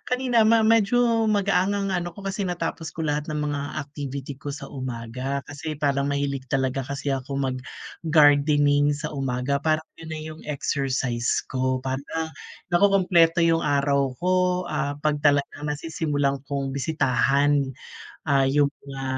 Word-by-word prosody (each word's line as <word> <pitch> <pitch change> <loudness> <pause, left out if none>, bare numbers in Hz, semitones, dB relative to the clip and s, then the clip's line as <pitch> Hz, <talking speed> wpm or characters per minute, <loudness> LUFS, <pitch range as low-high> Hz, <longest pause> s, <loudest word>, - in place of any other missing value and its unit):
kanina 250 -3 +2
ma 225 0 +5
medyo 230 +1 +3
magaang 200 -2 +2
ang 200 -1 -1
ano 175 -2 -2
ko, - - -10
kasi 195 +1 -2
natapos 165 -2 -3
ko - - -6
lahat 150 -1 -1
ng 150 -1 -3
mga 145 -1 -2 0.2
activity 140 -1 -6
ko 145 0 -5
sa 140 -1 -8
umaga. 130 +1 -4
Kasi 145 +2 -5
parang 140 -1 +1
mahilig 140 -2 -2
talaga 135 0 0
kasi 140 +2 -4
ako 135 +1 -2
mag-gardening 145 +2 +2
sa 150 +1 -4
umaga, 135 +1 -1
parang 155 +2 +1 0.2
'yon 165 - -10
na 160 - -4
yung 155 0 -8
exercise 135 -4 -1
ko, 130 0 0
parang 140 +5 -3 0.4
nakukumpleto 175 -2 +4
yung 165 -1 +3
araw 140 -2 +1
ko, 180 +1 +1 0.4
ah, 145 - -1
'pag 150 -1 -1
talagang 145 0 +2
nasisimulan 150 -2 -1
kong 140 -1 -3
bisitahan, 140 0 +2 0.6
ah, 135 -3 +3
yung 145 +1 +2 0.2
mga, 135 -1 -6
145 Hz, 145 wpm, -24 LUFS, 140-165 Hz, 0.6 s, ma